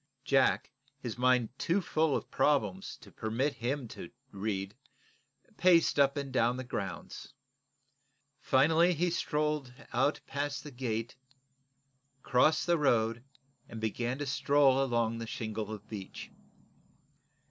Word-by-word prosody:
Jack, - - +2 0.3
his 120 -3 -5
mind 125 -2 +3
too 175 +4 +1
full 160 -5 +1
of - - -4
problems 105 -11 0
to - - -14
permit 120 +7 -1
him 125 +2 -3
to - - -8 0.2
read, 100 -1 -3 0.8
paced 170 -4 +4
up 140 +1 +4
and 140 -2 -4
down 120 +2 +2
the 130 - -4
grounds. 100 -7 -6 1.0
Finally 160 +6 +4
he 175 +3 +1
strolled, 150 -5 -1 0.2
out 135 +5 +2
past 145 +1 -3
the 150 - -9
gate, 120 -3 -3 1.1
crossed 155 +5 +3
the 170 -2 +2
road 115 -4 +2 0.5
and 115 - -7
began 120 +3 -2
to 145 - -3
stroll 135 0 +3
along 115 -3 0
the 115 - -5
shingle 110 -1 -4
of 105 -1 -8
bench. 100 -4 -8
130 Hz, 125 wpm, -31 LUFS, 110-145 Hz, 1.1 s, paced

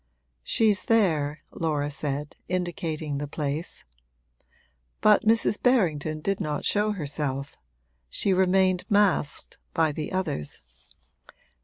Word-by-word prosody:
'She's 205 - +2
there,' 155 -10 +2
Laura 150 -3 -1
said, 145 0 -4
indicating 165 -5 -2
the 145 - -3
place; 150 +2 -4 1.1
but 215 +1 +5
Mrs. 225 -1 +3
Berrington 160 - +2
did 195 +4 -1
not 150 -1 -2
show 210 +1 +2
herself 145 -5 -3 0.5
she 195 - +1
remained 185 0 +3
masked 200 -8 +1 0.2
by 160 -3 +3
the 150 +1 -5
others. 165 - -2
160 Hz, 105 wpm, -26 LUFS, 145-195 Hz, 1.1 s, but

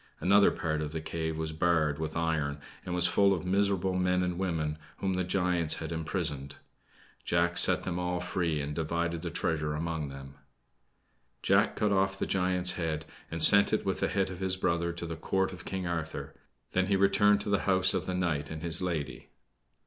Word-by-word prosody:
Another 100 +2 +5
part 80 -2 -2
of 75 0 -4
the 80 - -2
cave 80 0 -4
was 80 0 -3
barred 80 -2 +1
with 80 0 -4
iron 80 -3 -1 0.3
and 90 - -4
was 90 -1 +3
full 100 -1 +3
of 90 - -6
miserable 95 -1 +1
men 90 0 +1
and 90 0 -3
women 80 -5 -2 0.2
whom 95 -1 -1
the 90 0 0
giants 90 -3 +1
had 80 0 -6
imprisoned. 80 -4 -3 0.7
Jack 85 0 +1
set - - +6
them 90 -1 -3
all 90 0 -2
free 85 -4 -1
and 75 +1 -4
divided 85 +1 -2
the 85 - -4
treasure 75 -2 -2
among 80 -1 -3
them. 70 0 -10 1.1
Jack - - +3
cut 105 -1 0
off 95 0 +1
the - - -2
giant's 90 -1 +2
head, 80 -3 -3 0.2
and 85 -1 0
sent 100 +3 +7
it 110 - 0
with 95 - -1
the - - +1
head 95 -2 -1
of 90 - -8
his 95 -1 0
brother 85 -2 0
to 85 0 -6
the 80 0 -5
Court 95 +4 -1
of 90 - -11
King 95 -1 -4
Arthur; 80 -2 -4 0.4
then 95 0 +1
he 100 - +2
returned 100 +1 +4
to 105 - -3
the 100 - +2
house 95 -1 +4
of - - -2
the 90 - -2
knight 80 -5 -1
and 80 0 -7
his 85 +1 -1
lady. 80 -7 -4
85 Hz, 200 wpm, -29 LUFS, 80-95 Hz, 1.1 s, sent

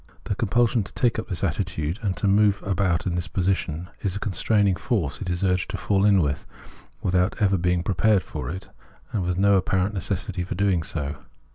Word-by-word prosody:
The - - -2
compulsion 115 +3 +2
to 95 - -8
take 120 -2 +2
up 110 - -6
this 90 -5 -4
attitude 80 +6 -1
and 95 -5 -2
move 100 0 +3
about 95 -3 +1
in 90 - 0
this 90 0 -1
position, 90 -3 -1
is 100 -2 -1
a - - -3
constraining 100 0 +2
force 90 - -2
it 95 - -3
is 90 +1 -1
urged 90 -1 +1
to - - -3
fall 100 -1 +1
in 100 -4 +5
with, 70 -1 -2 0.6
without 90 +1 +2
ever 100 -2 +3
being 90 -1 +1
prepared 100 +1 +2
for 65 -4 -6
it 95 +4 -6 0.4
and 105 - -1
with 90 0 -1
no 100 +1 +5
apparent 95 +2 +1
necessity 95 -1 -2
for 90 - -4
doing 95 -2 +2
so. 75 -2 -3
95 Hz, 200 wpm, -24 LUFS, 90-100 Hz, 0.6 s, in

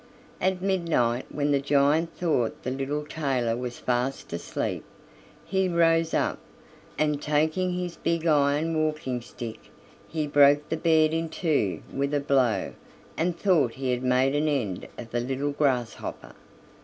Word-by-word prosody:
At 185 -1 0
midnight, 165 -11 +1
when 145 0 -1
the 140 - +3
giant 145 +4 +2
thought 150 -10 0
the 125 - -2
little 140 +3 -2
tailor 135 -7 -1
was 125 0 -5
fast 125 -2 -2
asleep, 85 - -3 0.6
he 190 -1 +1
rose 165 -1 +3
up, - - 0 0.6
and 150 -1 +1
taking 155 +5 +1
his 180 -1 -4
big 170 0 -1
iron 150 +1 +2
walking 155 -5 -1
stick, 115 -1 -8 0.5
he 155 -2 -2
broke 145 0 +5
the 160 - -1
bed 160 -1 +3
in 165 0 -1
two 150 - 0
with 140 +1 -1
a - - +2
blow, 135 -5 +1 0.4
and 170 +1 -1
thought 170 - +2
he 130 -1 -2
had 125 0 -1
made 130 +1 +2
an 150 +1 +1
end 115 -11 -1
of 115 -1 -9
the 120 - 0
little 135 +4 -2
grasshopper. 130 -5 -2
145 Hz, 150 wpm, -26 LUFS, 130-165 Hz, 0.6 s, broke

